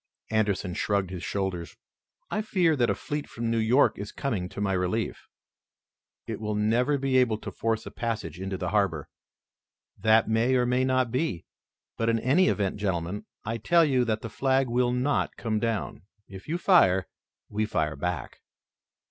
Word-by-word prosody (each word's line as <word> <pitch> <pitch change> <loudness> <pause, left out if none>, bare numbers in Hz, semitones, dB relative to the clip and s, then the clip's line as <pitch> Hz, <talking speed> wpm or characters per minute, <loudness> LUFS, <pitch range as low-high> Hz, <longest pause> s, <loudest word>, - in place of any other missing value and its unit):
Anderson 100 -4 0
shrugged 100 -1 0
his 90 -2 -6
shoulders. 95 -4 -3 0.5
"I 210 - 0
hear 180 -7 +2
that 120 -4 +2
a - - +1
fleet 150 0 -5
from 115 0 -3
New 115 - +1
York 115 +3 +3
is 100 +1 -5
coming 105 -10 -2
to - - -8
my 100 -2 0
relief." 95 +5 -2 1.0
"It - - -5
will 105 -1 -2
never 115 +7 +2
be 135 -1 +1
able 120 -4 +3
to - - -7
force 115 -1 -1
a - - -7
passage 105 -8 -4
into 95 0 -3
the - - -3
harbor." 95 -8 0 0.9
"That 110 0 +4
may 115 +4 +2
or 125 -1 +3
may 125 +1 +2
not 130 -2 +1
be, 125 - -1 0.5
but 115 0 +1
in 115 - +3
any 145 +11 +3
event, 100 -1 0
gentlemen, 95 -1 -2 0.2
I 115 +2 -2
tell 170 +8 +4
you 130 -4 +2
that 110 -1 -1
the 115 - -4
flag 135 0 +1
will 120 +1 +2
not 130 +4 0
come 110 -2 -1
down. 115 -2 -2 0.3
If 95 -1 -11
you 165 +3 -1
fire, 95 - +4 0.4
we 105 +1 -1
fire 80 -5 -1
back." 90 0 -4
110 Hz, 175 wpm, -27 LUFS, 100-130 Hz, 1.0 s, That